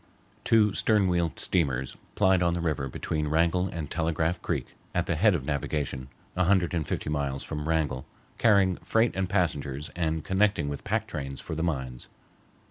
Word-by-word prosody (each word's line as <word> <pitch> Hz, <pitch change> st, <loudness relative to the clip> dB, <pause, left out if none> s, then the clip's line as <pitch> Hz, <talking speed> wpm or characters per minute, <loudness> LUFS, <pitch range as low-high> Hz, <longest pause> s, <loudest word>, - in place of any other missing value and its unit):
Two 105 Hz, -3 st, +4 dB
stern 105 Hz, -2 st, +3 dB
wheel 85 Hz, -2 st, +1 dB
steamers 65 Hz, -7 st, 0 dB, 0.2 s
plied 95 Hz, -1 st, +4 dB
on 85 Hz, -1 st, +2 dB
the -, -, -2 dB
river 75 Hz, -5 st, -1 dB
between 75 Hz, +3 st, -2 dB
Wrangell 85 Hz, +4 st, +2 dB
and 80 Hz, -4 st, -5 dB
Telegraph 80 Hz, +1 st, 0 dB
Creek 75 Hz, -8 st, -2 dB, 0.3 s
at -, -, +1 dB
the -, -, 0 dB
head 100 Hz, +4 st, +4 dB
of 70 Hz, -6 st, -3 dB
navigation, 70 Hz, -2 st, -2 dB, 0.3 s
a 95 Hz, -, +2 dB
hundred 90 Hz, -2 st, +3 dB
and 80 Hz, -4 st, -1 dB
fifty -, -, -3 dB
miles 70 Hz, -2 st, -1 dB
from 75 Hz, 0 st, -4 dB
Wrangell, 75 Hz, -5 st, 0 dB, 0.3 s
carrying 100 Hz, -5 st, +4 dB
freight 115 Hz, +1 st, +1 dB
and 95 Hz, -1 st, -1 dB
passengers 75 Hz, -6 st, -1 dB
and 80 Hz, -2 st, -1 dB
connecting 95 Hz, -6 st, +2 dB
with 70 Hz, -, -5 dB
pack 110 Hz, +1 st, 0 dB
trains 70 Hz, -9 st, -5 dB
for -, -, -6 dB
the 80 Hz, -, -2 dB
mines. 65 Hz, -7 st, -3 dB
80 Hz, 175 wpm, -28 LUFS, 75-95 Hz, 0.3 s, Two